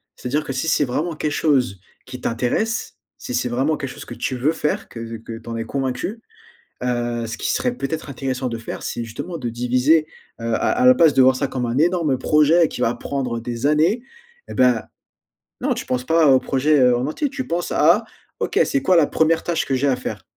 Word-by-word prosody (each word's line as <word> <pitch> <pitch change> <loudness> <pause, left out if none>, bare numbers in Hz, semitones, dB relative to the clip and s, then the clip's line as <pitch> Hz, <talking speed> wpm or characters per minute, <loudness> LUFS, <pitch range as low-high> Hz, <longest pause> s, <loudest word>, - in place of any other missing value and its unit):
C'est-à-dire 145 +5 -2
que 135 - -5
si 135 +5 -2
c'est 145 - +3
vraiment 155 +6 -2
quelque 150 -1 -2
chose 130 - +1 0.3
qui 130 -1 -8
t'intéresse, 125 - -1 0.2
si 125 - -5
c'est 125 0 0
vraiment 135 +6 0
quelque 135 - -4
chose - - -10
que - - -8
tu 130 - -2
veux 135 +6 +1
faire, 150 -2 -2
que 115 -1 -7
que 115 0 -8
tu 115 0 -11
en 115 - -4
es 115 - -2
convaincu, 140 - -3 0.6
heu, 120 -1 -1
ce 115 - -5
qui - - -1
serait 250 -1 0
peut-être 155 - -4
intéressant 130 -1 -3
de 115 -1 -4
faire, 115 - -7
c'est 120 - -4
justement 165 +10 -6
de 120 -3 -3
diviser, 125 +7 +2 0.3
heu - - -6
à - - +3 0.2
à 250 +1 +2
la 255 - +8
place 165 - +5
de 135 - +6
voir 130 0 +5
ça 140 - 0
comme 125 -2 -3
un 120 +3 -1
énorme 165 -5 +2
projet 155 +4 +4
qui 125 - -5
va 115 - +2
prendre 125 -4 -3
des 120 +3 -3
années, 165 +11 +2 0.5
eh - - -7
ben, 125 -3 +3 0.8
non - - +1
tu - - -6
penses 125 0 -1
pas 160 0 +3
au 130 -1 +6
projet, 145 +3 +2
heu, 125 -1 +5
en 130 - -1
entier 275 - -2
tu 265 -2 -5
penses 170 +1 -2
à: 175 +9 +4 0.4
«OK, - - 0
c'est 275 -1 -1
quoi 185 -8 +4
la 155 -3 +5
1re 160 +1 +2
tâche 170 -2 0
que 135 - -1
j'ai 140 +2 +1
à 130 - +2
faire?» 125 - -6
135 Hz, 225 wpm, -21 LUFS, 125-160 Hz, 0.8 s, la